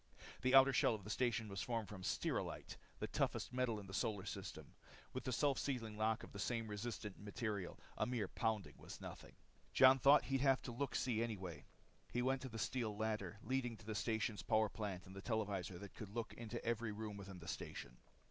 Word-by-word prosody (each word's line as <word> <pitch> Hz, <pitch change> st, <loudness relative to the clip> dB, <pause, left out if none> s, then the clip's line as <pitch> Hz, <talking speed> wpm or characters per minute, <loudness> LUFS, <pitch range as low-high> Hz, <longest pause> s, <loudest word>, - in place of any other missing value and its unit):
The 130 Hz, +1 st, +4 dB
outer 135 Hz, 0 st, +9 dB
shell 120 Hz, -, +4 dB
of 105 Hz, -, -8 dB
the 105 Hz, -, -5 dB
station 120 Hz, -1 st, +1 dB
was 100 Hz, -1 st, -3 dB
formed 115 Hz, -3 st, -1 dB
from 100 Hz, -3 st, -7 dB
stelrylite, -, -, -1 dB, 0.2 s
the -, -, -2 dB
toughest -, -, 0 dB
metal 125 Hz, -4 st, +1 dB
in 100 Hz, -, -8 dB
the 95 Hz, -, -9 dB
solar 100 Hz, -1 st, 0 dB
system. -, -, -6 dB, 0.4 s
With 130 Hz, -, -4 dB
the 130 Hz, -, 0 dB
self 140 Hz, +2 st, +3 dB
sealing 115 Hz, -6 st, -2 dB
lock 110 Hz, +1 st, +1 dB
of -, -, -9 dB
the 100 Hz, -, -7 dB
same 115 Hz, +1 st, 0 dB
resistant 105 Hz, -1 st, -4 dB
material, 105 Hz, -2 st, -3 dB, 0.2 s
a -, -, +1 dB
mere 120 Hz, -5 st, 0 dB
pounding 110 Hz, 0 st, 0 dB
was -, -, -8 dB
nothing. -, -, -8 dB, 0.4 s
Jon 130 Hz, 0 st, +8 dB
thought 140 Hz, +3 st, +8 dB
he'd 135 Hz, -1 st, +1 dB
have 135 Hz, -1 st, +4 dB
a -, -, -3 dB
look 135 Hz, +4 st, -2 dB
see 115 Hz, -3 st, +1 dB
anyway. 95 Hz, -9 st, -3 dB, 0.5 s
He 125 Hz, -, +1 dB
went 130 Hz, +1 st, +1 dB
up 130 Hz, -, -5 dB
the 115 Hz, -, -5 dB
steel 110 Hz, -2 st, -1 dB
ladder 110 Hz, 0 st, -1 dB
leading 125 Hz, -3 st, 0 dB
to 110 Hz, -, -15 dB
the 110 Hz, -, -2 dB
station's 110 Hz, +1 st, 0 dB
power 110 Hz, -1 st, +3 dB
plant 100 Hz, -4 st, -4 dB
and 95 Hz, -, -10 dB
the 95 Hz, -, -6 dB
televisor 100 Hz, -5 st, -1 dB
that 100 Hz, +2 st, -8 dB
could 105 Hz, -, -7 dB
look 115 Hz, +2 st, -3 dB
into 115 Hz, 0 st, -5 dB
every 115 Hz, -1 st, 0 dB
room 105 Hz, 0 st, -4 dB
within 100 Hz, -1 st, -7 dB
the 85 Hz, -1 st, -10 dB
station. -, -, -5 dB
110 Hz, 210 wpm, -40 LUFS, 105-125 Hz, 0.5 s, outer